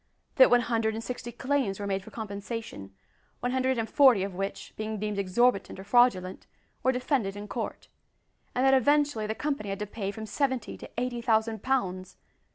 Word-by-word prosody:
that 260 - +8
one 245 0 +5
hundred 225 -2 0
and 225 - -5
sixty 240 -1 -5
claims 260 -6 -1
were 205 - -3
made 195 -1 -1
for - - -11
compensation 205 - -6 0.5
one 245 - -1
hundred 260 0 +1
and 225 -1 -1
forty 255 -9 +5
of 195 -1 -4
which, 195 +2 -5
being 215 0 -4
deemed 210 -1 -2
exorbitant 200 +1 +1
or - - -7
fraudulent, 200 -5 +2 0.3
were 260 - +3
defended 250 -6 -1
in 205 0 -7
court; 225 +2 -5 0.7
and 255 - +2
that, 270 - +5
eventually, 285 -3 +3
the 220 - -2
company 280 -8 -2
had 195 - -2
to 210 - -3
pay 205 -1 -4
from 220 +2 -6
seventy 260 0 -1
to - - -10
eighty 245 0 -2
thousand 220 -2 +1
pounds! 185 -9 -1
225 Hz, 185 wpm, -28 LUFS, 200-250 Hz, 0.7 s, that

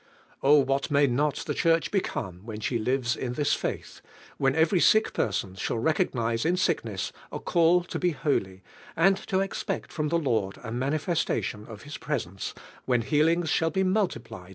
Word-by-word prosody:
O 145 +2 +6
what 135 +1 0
msiy 140 -1 +4
not 140 +3 +1
the - - -2
Church 165 -1 +2
become 95 - -3
when 110 -1 -7
she 115 +2 -1
lives 125 +2 0
in 125 -1 -4
this 145 +2 +1
fail - - -1
h. - - -15 0.4
when 135 0 +2
every 160 +3 +3
sick 215 +5 +4
person 95 -3 -1
shall 95 +4 -2
recognise 115 -5 0
in 170 +3 +2
sh 185 - +2
kness 110 - -4 0.2
a - - -4 0.2
rail 175 +1 +5
to - - -5
be 180 - +2
holy, 95 - -1 0.3
anil 190 +3 +3
to 190 0 +1
expect 195 - -3
from 155 -2 -2
the 170 +3 +1
Lord 110 -11 -1
a 110 - -6
manifestation 135 - -1
of 110 -3 -10
Ilis 145 +1 -8
presence, 110 - -4 0.3
when 125 -2 +2
healings 160 +4 +2
shall 165 - +2
be 190 +3 0
multiple 120 - -1
140 Hz, 180 wpm, -27 LUFS, 115-165 Hz, 0.4 s, O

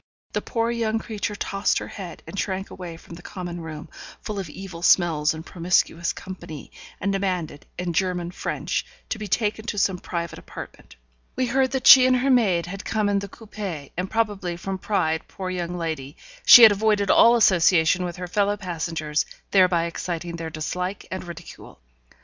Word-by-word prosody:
The - - -1
poor 230 -1 -1
young 225 -2 0
creature 215 -1 -4
tossed 195 0 0
her - - -4
head, 185 -5 -8
and 200 - -6
shrank 190 0 -3
away 175 -3 -8
from 170 - -14
the 170 - -10
common 175 -1 -6
room, 155 -2 -8 0.3
full 210 -2 -5
of 185 -5 -5
evil 180 0 -9
smells 165 -4 +4
and 160 +1 -7
promiscuous 170 -1 +1
company, 175 -5 -9 0.3
and 200 0 -1
demanded, 180 -7 -3
in 180 -1 -3
German 175 0 -1
French, - - -3 0.3
to 220 - -3
be 210 - -5
taken 215 +2 0
to 210 - -3
some 190 -2 +1
private 170 -2 -5
apartment. - - -11 0.4
We 255 - +1
heard 260 +2 +2
that 265 -1 -2
she 255 -1 +10
and 255 - +4
her 260 +2 +2
maid 195 -9 +3
had 195 +3 -7
come 215 -2 0
in 200 -1 +2
the 200 0 -7
coupé, 200 -10 -7
and, 185 +2 -3
probably 205 -6 -1
from 190 +2 -4
pride, 160 -6 -1
poor 185 -1 -5
young 175 -1 -3
lady! 155 -5 -4 0.3
she 240 - +11
had 220 - +11
avoided 205 -1 +2
all 235 +1 +7
association 180 -4 +4
with 175 -1 -4
her 180 0 -6
fellow 205 +2 +1
passengers, 165 -5 -2 0.2
thereby 180 -3 +4
exciting 170 0 -4
their 165 -1 -5
dislike 180 +5 -4
and 185 -1 -5
ridicule. 170 - -11
185 Hz, 180 wpm, -24 LUFS, 170-205 Hz, 0.4 s, she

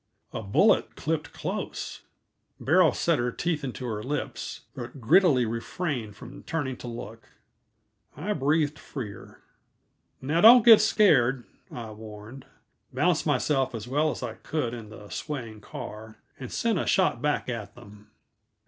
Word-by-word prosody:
A - - -3
bullet 100 -2 +3
clipped 155 0 -2
close. - - -5 0.6
Beryl 165 +2 +4
set 165 -5 +1
her 120 0 0
teeth 160 +2 -2
into 130 -1 -5
her 110 -3 -3
lips, 140 +5 -4
but 120 +3 -8
grittily 145 -1 +4
refrained 115 - -3
from 125 +4 -11
turning 145 -5 -3
to - - -9
look. 115 -1 -8 0.9
I 195 +8 -2
breathed 150 0 +1
freer. 115 -8 -9 0.8
"Now, 155 +6 0
don't 235 +1 +9
get 225 -3 +9
scared," 135 - +4 0.3
I 115 -3 -7
warned, 110 +4 -11 0.4
balanced - - +1
myself 135 -4 +1
as 115 +1 -6
well 150 +5 +1
as 145 - -5
I 120 -3 -4
could 135 -4 -3
in 115 -3 -8
the 105 -1 -12
swaying 115 -8 -6
car, 110 +2 -9 0.2
and 130 - -7
sent 225 -6 0
a - - -2
shot 190 - +2
back 150 0 0
at 110 -4 -5
them. 105 -3 -15
130 Hz, 145 wpm, -27 LUFS, 115-155 Hz, 0.9 s, don't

